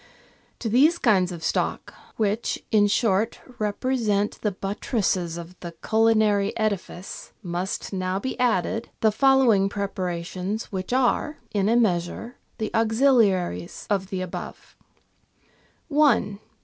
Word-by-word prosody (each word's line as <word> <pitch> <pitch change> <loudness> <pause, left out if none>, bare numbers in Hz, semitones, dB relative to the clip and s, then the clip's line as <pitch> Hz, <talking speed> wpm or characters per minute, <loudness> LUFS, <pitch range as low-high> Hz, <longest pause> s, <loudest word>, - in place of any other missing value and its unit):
To 235 - -4
these 280 +10 +4
kinds 190 - +3
of 170 -2 -7
stock, - - -1 0.2
which, 215 +1 0
in 205 -1 +5
short, 215 +1 +1 0.2
represent 210 -1 0
the 210 - +1
buttresses 195 -3 -2
of 170 +1 -9
the 170 -1 -7
culinary 215 -2 +3
edifice, 200 -4 -4
must 180 +3 -4
now 185 0 -1
be 260 +7 -3
added 225 -2 0
the 220 - +4
follow 265 +1 +4
ing 195 -1 +2
preparations, 185 +1 -4
which 190 +1 -4
are, 265 +4 +1
in 200 0 +1
a 230 - +3
measure, 215 +1 0 0.2
the 220 -2 -3
auxiliaries 220 - +2
of 195 -2 +1
the 190 -2 -4
above: 185 -1 -7 0.5
— - - -37
1. 285 -9 +2
205 Hz, 125 wpm, -24 LUFS, 185-230 Hz, 0.5 s, in